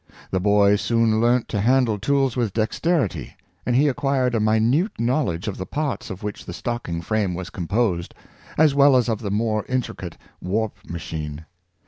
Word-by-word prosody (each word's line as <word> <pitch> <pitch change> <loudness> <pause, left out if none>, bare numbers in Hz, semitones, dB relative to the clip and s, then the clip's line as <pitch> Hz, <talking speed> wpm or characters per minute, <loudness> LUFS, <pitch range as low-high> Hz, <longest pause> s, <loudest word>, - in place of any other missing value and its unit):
The 95 - +1
boy 100 +1 +4
soon 115 0 +2
learnt 120 +1 +2
to 105 - -1
handle 120 -2 +2
tools 135 +2 +1
with 115 -6 -1
dexterity, 125 - -1 0.3
and 125 - +2
he 145 +4 +4
acquired 135 -2 +1
a 115 - +1
minute 110 - +2
knowledge 115 - 0
of 100 - -3
the 95 - -4
parts 145 -5 -3
of 95 +1 -7
which 105 -1 -5
the 90 - -6
stocking 90 -5 -4
frame 100 -1 0
was 90 0 -6
composed, 95 -1 -1 0.4
as 155 -2 +5
well 140 -1 +6
as 125 - +2
of 110 -2 0
the 105 - -4
more 110 +1 0
intricate 120 -9 -3 0.2
warp 105 +4 -1
machine. 80 -2 -5
110 Hz, 170 wpm, -23 LUFS, 100-125 Hz, 0.4 s, well